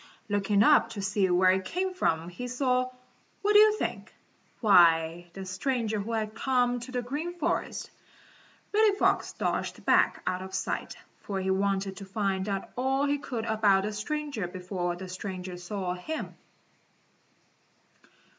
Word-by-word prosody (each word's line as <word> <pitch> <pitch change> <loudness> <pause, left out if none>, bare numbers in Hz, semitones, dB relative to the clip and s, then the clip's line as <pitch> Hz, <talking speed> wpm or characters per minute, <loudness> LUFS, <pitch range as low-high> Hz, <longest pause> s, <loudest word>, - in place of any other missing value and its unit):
Looking 205 0 +2
up 230 - +5
to 205 - -5
see 195 -1 +1
where 185 +1 +5
it 190 0 0
came 370 - -2
from 165 - 0
he 245 +8 -6
saw 255 0 +1 0.5
what 415 +1 +3
do 415 - +9
you 430 0 +6
think? - - -4 0.5
Why, 170 -4 +4
the 195 0 -7
stranger 220 +3 -1
who 220 +3 -4
had 215 -1 -2
come 245 0 +1
to 240 +2 -9
the 250 -1 -2
Green 310 +8 -4
Forest. 330 - -2 0.8
Reddy 425 -1 +4
Fox - - +1
dodged - - -3
back - - +3
out 185 0 -1
of 190 0 -6
sight, 190 - -3 0.2
for 195 -2 -4
he 190 0 0
wanted 195 0 0
to 195 - -8
find 195 0 -1
out 195 -1 -3
all 265 +2 +1
he 290 0 +1
could 240 -5 -4
about 210 -3 +3
the 210 +1 -3
stranger 275 -1 -3
before 180 -1 -3
the 185 +1 -8
stranger 185 0 -6
saw 180 +1 -4
him. 245 - -5
205 Hz, 155 wpm, -28 LUFS, 185-255 Hz, 0.8 s, do